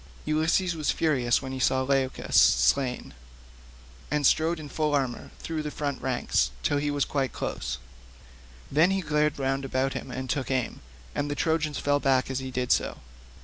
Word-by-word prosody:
Ulysses 160 Hz, +4 st, +2 dB
was 155 Hz, -2 st, -2 dB
furious 130 Hz, -6 st, +2 dB
when 130 Hz, -, -5 dB
he 130 Hz, -, -4 dB
saw 130 Hz, +1 st, +2 dB
Leucus 135 Hz, -1 st, -1 dB
slain, 130 Hz, -3 st, +3 dB, 1.0 s
and 150 Hz, -1 st, 0 dB
strode 160 Hz, +4 st, +3 dB
in 155 Hz, -, -7 dB
full 150 Hz, +1 st, 0 dB
armour 130 Hz, -4 st, -2 dB
through 160 Hz, -1 st, -4 dB
the 150 Hz, -, -4 dB
front 145 Hz, -2 st, -3 dB
ranks 130 Hz, -1 st, +1 dB
till 145 Hz, -, +2 dB
he 145 Hz, 0 st, -1 dB
was 145 Hz, -1 st, +1 dB
quite 135 Hz, -3 st, -1 dB
close; 60 Hz, +1 st, -3 dB, 0.9 s
then 155 Hz, +5 st, +5 dB
he 195 Hz, 0 st, +1 dB
glared 150 Hz, -2 st, +1 dB
round 135 Hz, 0 st, -1 dB
about 135 Hz, 0 st, 0 dB
him -, -, -6 dB
and 130 Hz, +1 st, -5 dB
took 130 Hz, +1 st, -2 dB
aim, 130 Hz, -3 st, -1 dB, 0.3 s
and 145 Hz, -, -2 dB
the 145 Hz, -, -2 dB
Trojans 155 Hz, -1 st, 0 dB
fell 145 Hz, 0 st, +1 dB
back 135 Hz, -2 st, +2 dB
as 130 Hz, -, -1 dB
he 130 Hz, 0 st, -5 dB
did 125 Hz, -1 st, -2 dB
so. -, -, +1 dB
140 Hz, 180 wpm, -27 LUFS, 130-150 Hz, 1.0 s, then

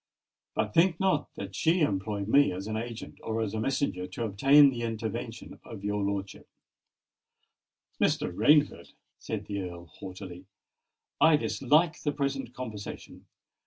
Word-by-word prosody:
"But 105 Hz, -, -1 dB
think 170 Hz, 0 st, +4 dB
not 190 Hz, -6 st, +1 dB
that 95 Hz, -1 st, -7 dB
she 165 Hz, +2 st, +2 dB
employed 100 Hz, -5 st, -1 dB
me 140 Hz, +6 st, +5 dB
as 95 Hz, +2 st, -5 dB
an 110 Hz, 0 st, -3 dB
agent 115 Hz, +1 st, -6 dB
or 110 Hz, 0 st, -2 dB
as 110 Hz, -2 st, -2 dB
a 110 Hz, -, -2 dB
messenger 110 Hz, -7 st, -1 dB
to 95 Hz, +6 st, -5 dB
obtain 135 Hz, +8 st, +6 dB
the 120 Hz, -2 st, -5 dB
intervention 115 Hz, -2 st, -5 dB
of 100 Hz, -, -10 dB
your 105 Hz, 0 st, -1 dB
lordship——" 100 Hz, 0 st, -4 dB, 1.5 s
"Mr. -, -, +1 dB
Rainford," 140 Hz, -, +3 dB, 0.3 s
said -, -, -5 dB
the 100 Hz, -1 st, -3 dB
Earl 85 Hz, -2 st, -7 dB
haughtily, 90 Hz, +1 st, -10 dB, 0.7 s
"I 160 Hz, -1 st, +6 dB
dislike 150 Hz, +3 st, +2 dB
the 145 Hz, -, 0 dB
present 140 Hz, -3 st, -3 dB
conversation. 110 Hz, -5 st, -8 dB
110 Hz, 140 wpm, -29 LUFS, 100-140 Hz, 1.5 s, obtain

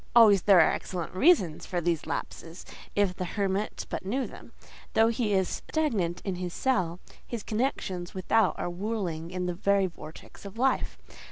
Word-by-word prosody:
Always 210 Hz, -5 st, +7 dB
there 195 Hz, -1 st, +6 dB
are 160 Hz, -, +6 dB
excellent 175 Hz, -3 st, -4 dB
reasons 185 Hz, -, +3 dB
for 180 Hz, -, -1 dB
these 170 Hz, -2 st, -1 dB
lapses, 165 Hz, +2 st, -6 dB, 0.3 s
if 205 Hz, -3 st, +2 dB
the 185 Hz, -, -3 dB
hermit 195 Hz, +2 st, -2 dB
but -, -, -4 dB
knew 250 Hz, +8 st, -1 dB
them. -, -, -12 dB, 0.4 s
Though 225 Hz, +1 st, +5 dB
he 225 Hz, -2 st, 0 dB
is 190 Hz, -2 st, +2 dB, 0.2 s
stagnant 210 Hz, -, 0 dB
in 190 Hz, -3 st, -2 dB
his 180 Hz, -1 st, -5 dB
cell, 180 Hz, -10 st, 0 dB, 0.2 s
his 235 Hz, -3 st, -6 dB
connections 205 Hz, -7 st, -2 dB
without 190 Hz, +2 st, +2 dB
are -, -, -2 dB
whirling 175 Hz, -3 st, -3 dB
in 180 Hz, 0 st, -3 dB
the 180 Hz, -, -1 dB
very 200 Hz, +2 st, +2 dB
vortex 160 Hz, -3 st, -10 dB
of 200 Hz, +2 st, -9 dB
life. 265 Hz, +2 st, +1 dB
190 Hz, 170 wpm, -28 LUFS, 175-220 Hz, 0.4 s, Always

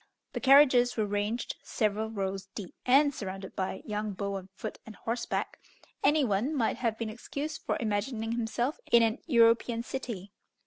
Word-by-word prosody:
The -, -, -2 dB
carriages 260 Hz, -3 st, +6 dB
were 215 Hz, -, +2 dB
ranged 205 Hz, +3 st, -2 dB
several 215 Hz, 0 st, -1 dB
rows 195 Hz, -2 st, -3 dB
deep, 195 Hz, -5 st, -7 dB
and 285 Hz, +3 st, +5 dB
surrounded 195 Hz, -4 st, -6 dB
by 190 Hz, 0 st, -3 dB
young 210 Hz, -1 st, -3 dB
beaux 200 Hz, +1 st, -3 dB
on 190 Hz, -1 st, -6 dB
foot -, -, -6 dB
and 220 Hz, -, -11 dB
horseback; 235 Hz, +3 st, -3 dB, 0.4 s
any 300 Hz, 0 st, +4 dB
one 235 Hz, +6 st, 0 dB
might 235 Hz, -5 st, +1 dB
have 230 Hz, -3 st, -1 dB
been 225 Hz, -1 st, -3 dB
excused 285 Hz, +7 st, -5 dB
for -, -, +1 dB
imagining 220 Hz, +1 st, -1 dB
himself 235 Hz, +4 st, -1 dB
in 235 Hz, -1 st, +7 dB
an 225 Hz, +3 st, +1 dB
European 230 Hz, -3 st, +4 dB
city. 230 Hz, -7 st, -5 dB
225 Hz, 165 wpm, -30 LUFS, 205-245 Hz, 0.4 s, in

